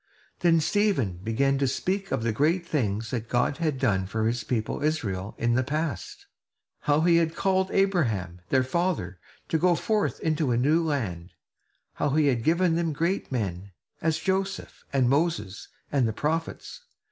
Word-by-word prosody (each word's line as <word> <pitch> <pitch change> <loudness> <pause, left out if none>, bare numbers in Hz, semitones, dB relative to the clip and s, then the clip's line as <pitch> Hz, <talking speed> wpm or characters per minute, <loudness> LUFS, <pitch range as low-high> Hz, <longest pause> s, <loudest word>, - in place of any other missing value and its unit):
Then 170 -2 +4
Stephen 165 - +1
began 135 +5 +1
to 135 - +2
speak 190 +9 -2
of 115 - 0
the 115 - +1
great 160 +9 +1
things 115 -8 -1
that 115 -2 -3
God 125 +3 +1
had 155 -4 -1
done 100 -8 +1
for 110 +2 -1
his 120 +1 0
people 110 -1 -2
Israel 105 -11 -2
in 120 0 +1
the 130 - +3
past; 155 +3 -3 0.5
how 145 +1 +2
he 170 0 +5
had 165 -1 +1
called 190 -1 +1
Abraham, 115 - 0
their 130 -1 +3
father, 130 - -1 0.3
to 160 - 0
go 180 +1 +4
forth 215 +4 0
into 155 -3 0
a 120 - +2
new 150 +7 +3
land; 100 - -3 0.6
how 145 - 0
he 155 -1 +4
had 120 -4 0
given 170 +2 +3
them 165 -2 0
great 170 +5 -1
men, 100 -5 -3 0.3
as 160 -1 +1
Joseph, 195 0 -2
and 135 -3 +2
Moses, 135 - 0 0.2
and 135 -4 +2
the 110 - -2
prophets. 160 - -3
145 Hz, 170 wpm, -26 LUFS, 115-170 Hz, 0.6 s, he